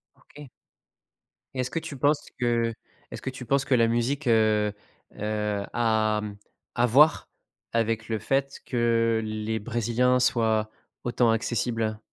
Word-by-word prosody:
OK. 145 -2 -14 1.0
Et 130 - -6
est-ce 125 0 -1
que 165 - -1
tu 145 -3 -8
penses 145 +3 +2 0.2
que 120 -1 +1 0.4
est-ce - - -7
que - - -3
tu 130 -1 -8
penses 140 +3 +2
que 130 - +3
la 115 -1 +4
musique, 125 +5 -1
heu, 110 -2 +3 0.4
heu, 105 -1 -2
a, 110 -2 +2
mmh, 105 -1 -7 0.4
à 120 - +3
voir 145 +7 +4 0.4
avec 115 -1 -1
le 110 -1 -1
fait 135 +5 -1
que 115 -2 +1
les 110 +1 -3
Brésiliens 120 +3 +1
soient, 110 -3 +2 0.4
autant 120 -1 +2
accessibles? 115 -1 -1
115 Hz, 145 wpm, -26 LUFS, 110-125 Hz, 1.0 s, la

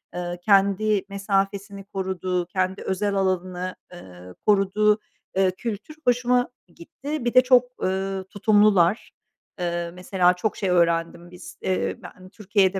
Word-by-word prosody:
ııı, 175 0 -4
kendi 200 +1 +3
mesafesini 200 0 -2
koruduğu, 185 -2 -3
kendi 185 +2 -2
özel 200 +2 -1
alanını, 185 -1 -1 0.2
ııı, 90 - -12
koruduğu, 210 +1 +3 0.4
eee, 190 -1 +3
kültür 225 +8 -6
hoşuma 245 0 +2 0.3
gitti. 280 - -6
Bir 240 - 0
de 255 - +8
çok, 250 -1 +5 0.2
ııı, 190 0 -1
tutumlular. 205 -1 +3 0.5
Iıı, 170 -1 -2
mesela, 180 0 +2
çok 190 +4 -2
şey 195 - -1
öğrendim. 170 0 +1
Biz, 180 - -12
eee, 95 0 -1
ben 185 0 -12
Türkiye'de, 200 -2 +1
190 Hz, 125 wpm, -24 LUFS, 180-205 Hz, 0.5 s, de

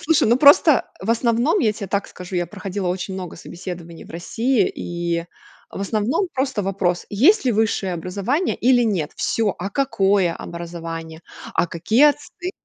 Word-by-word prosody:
Слушай, 310 -6 +2
ну 235 - +5
просто 285 -1 +6
в 205 +4 -2
основном 235 - +2
я 215 -10 +2
те 205 -2 -6
так 200 +2 -2
скажу, 180 0 -7
я 175 -1 0
проходила 195 0 -4
очень 185 +1 -3
много 185 -3 -6
собеседований 170 -1 -8
в - - -15
России, 220 +6 0
и 170 -1 -3 0.5
в - - -7
основном 220 - 0
просто 265 -5 -1
вопрос: 185 -2 -1
"Есть 285 - +4
ли 250 - +2
высшее 205 -3 0
образование 200 - -1
или 245 0 +4
нет". 185 -9 0
Всё! 220 -3 0
А 195 +3 -4
какое 195 -8 +1
образование? 165 -1 -7 0.3
А - - +2
какие 215 - +2
оценки? 355 +5 -7
200 Hz, 160 wpm, -21 LUFS, 175-240 Hz, 0.5 s, просто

